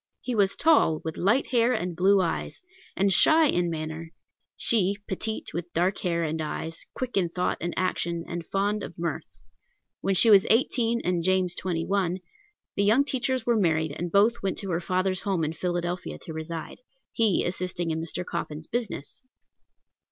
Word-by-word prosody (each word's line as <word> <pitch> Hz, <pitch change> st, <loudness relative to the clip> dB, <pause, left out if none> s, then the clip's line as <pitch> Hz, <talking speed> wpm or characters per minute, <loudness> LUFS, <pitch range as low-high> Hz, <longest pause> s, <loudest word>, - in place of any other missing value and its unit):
He 250 Hz, -, -3 dB
was 200 Hz, -3 st, +2 dB
tall, 290 Hz, -, +4 dB
with 160 Hz, -1 st, -4 dB
light 225 Hz, +9 st, +2 dB
hair 240 Hz, 0 st, +3 dB
and 180 Hz, -6 st, -2 dB
blue 190 Hz, +3 st, +4 dB
eyes, 175 Hz, -, -3 dB, 0.3 s
and 195 Hz, +1 st, +3 dB
shy 315 Hz, -, +6 dB
in 175 Hz, -, +2 dB
manner; 160 Hz, 0 st, -5 dB, 0.5 s
she, 200 Hz, -4 st, +2 dB
petite, 220 Hz, +3 st, -4 dB
with 175 Hz, 0 st, -5 dB
dark 180 Hz, +4 st, +1 dB
hair 170 Hz, -2 st, 0 dB
and 160 Hz, 0 st, -2 dB
eyes, 160 Hz, +1 st, -5 dB
quick 250 Hz, -4 st, -3 dB
in 180 Hz, -3 st, +2 dB
thought 180 Hz, +2 st, -1 dB
and 175 Hz, -, -2 dB
action, 170 Hz, -2 st, -1 dB
and 175 Hz, -1 st, -4 dB
fond 205 Hz, +4 st, -1 dB
of 175 Hz, -, -8 dB
mirth. 170 Hz, -2 st, -5 dB, 0.6 s
When 195 Hz, -, 0 dB
she 225 Hz, +4 st, +6 dB
was 195 Hz, -2 st, +7 dB
eighteen 235 Hz, 0 st, +2 dB
and 175 Hz, -1 st, 0 dB
James 185 Hz, 0 st, +1 dB
twenty 170 Hz, -3 st, -2 dB
one, 185 Hz, -3 st, 0 dB, 0.6 s
the 200 Hz, -, +2 dB
young 225 Hz, +8 st, +4 dB
teachers 260 Hz, -3 st, -1 dB
were 240 Hz, -, +3 dB
married, 160 Hz, -6 st, +1 dB
and 170 Hz, +4 st, -4 dB
both 220 Hz, +5 st, +3 dB
went 195 Hz, -2 st, -2 dB
to 195 Hz, -2 st, -4 dB
her 170 Hz, +1 st, 0 dB
father's 185 Hz, +1 st, 0 dB
home 190 Hz, -5 st, -1 dB
in 155 Hz, +1 st, -1 dB
Philadelphia 175 Hz, +1 st, -3 dB
to 160 Hz, -, -7 dB
reside, 160 Hz, +1 st, -6 dB, 0.3 s
he 220 Hz, -5 st, +2 dB
assisting 175 Hz, -1 st, -2 dB
in 160 Hz, 0 st, -2 dB
Mr. 170 Hz, +2 st, -4 dB
Coffin's 155 Hz, -3 st, -5 dB
business. 225 Hz, -, -4 dB
180 Hz, 175 wpm, -26 LUFS, 170-205 Hz, 0.6 s, was